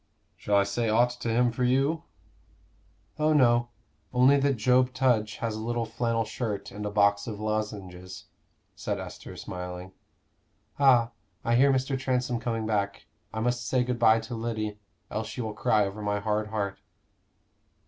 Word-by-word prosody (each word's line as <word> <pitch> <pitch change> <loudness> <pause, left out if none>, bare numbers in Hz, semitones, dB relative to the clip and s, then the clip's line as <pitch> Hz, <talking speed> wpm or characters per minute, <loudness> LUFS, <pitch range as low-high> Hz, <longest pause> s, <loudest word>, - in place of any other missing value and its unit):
"Shall 105 - -1
I 100 - +5
say 110 +3 -1
aught 120 +3 +4
to 120 - -3
him 120 +1 +3
for 125 +2 -2
you?" 135 +6 +2 1.2
"Oh, 155 +1 +3
no; 120 -4 +4 0.4
only 130 +3 +5
that 140 0 +2
Job 125 +3 +3
Tudge 115 -5 +2
has 115 -2 -3
a - - -5
little 120 +1 -1
flannel 115 0 -1
shirt 110 -2 -4
and 105 +1 -5
a - - -2
box 100 0 +2
of 105 -3 -5
lozenges," 100 -4 -4 0.5
said - - -3
Esther, - - -8
smiling. 90 0 -7 0.9
"Ah, 125 -4 +5 0.3
I 115 - +2
hear 135 +3 +5
Mr. 130 0 0
Transome 125 -2 0
coming 115 -1 -2
back. 105 -2 -1 0.3
I 110 - -3
must 120 +1 -1
say 125 -1 +2
good 125 -1 -2
bye 115 -1 +5
to 115 +2 -7
Lyddy, 110 -2 -3 0.3
else 110 0 -3
she 115 +2 -5
will 110 -2 -4
cry 105 0 +2
over 100 +2 -6
my 105 0 -1
hard 105 +1 -1
heart." 100 -2 -3
115 Hz, 165 wpm, -27 LUFS, 105-125 Hz, 1.2 s, I